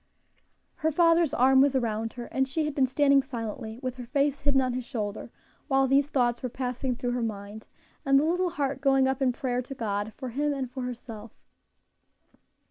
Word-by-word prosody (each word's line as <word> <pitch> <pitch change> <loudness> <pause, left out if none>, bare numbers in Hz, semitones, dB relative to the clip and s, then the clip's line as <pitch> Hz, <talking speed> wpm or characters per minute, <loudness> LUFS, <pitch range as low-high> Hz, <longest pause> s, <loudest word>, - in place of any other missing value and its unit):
Her 315 +1 0
father's 330 -1 +4
arm 265 +2 +5
was 275 -1 +3
around 225 -3 -1
her, 240 -1 -7
and 265 0 +1
she 305 +4 -1
had 300 - -2
been 270 -2 +2
standing 280 +1 +4
silently, 230 -3 -6
with 255 0 -3
her 250 - -7
face 280 +1 0
hidden 280 -2 +2
on 255 -1 0
his 255 0 -3
shoulder, 215 -5 -4 0.4
while 270 -1 +3
these 275 +2 +3
thoughts 240 -4 +1
were 255 - -3
passing 250 +1 -3
through 245 0 -2
her 245 0 -1
mind, 210 -1 -5 0.4
and 275 0 +4
the - - +1
little 355 +2 +1
heart 280 -5 -2
going 270 -1 +4
up 265 0 -1
in 260 -2 +3
prayer 250 -2 -2
to 260 +2 -8
God 210 -3 -2
for 260 -2 -5
him 290 +4 -1
and 260 -3 -4
for 260 0 -5
herself. 235 -3 -7
260 Hz, 200 wpm, -27 LUFS, 240-275 Hz, 0.4 s, arm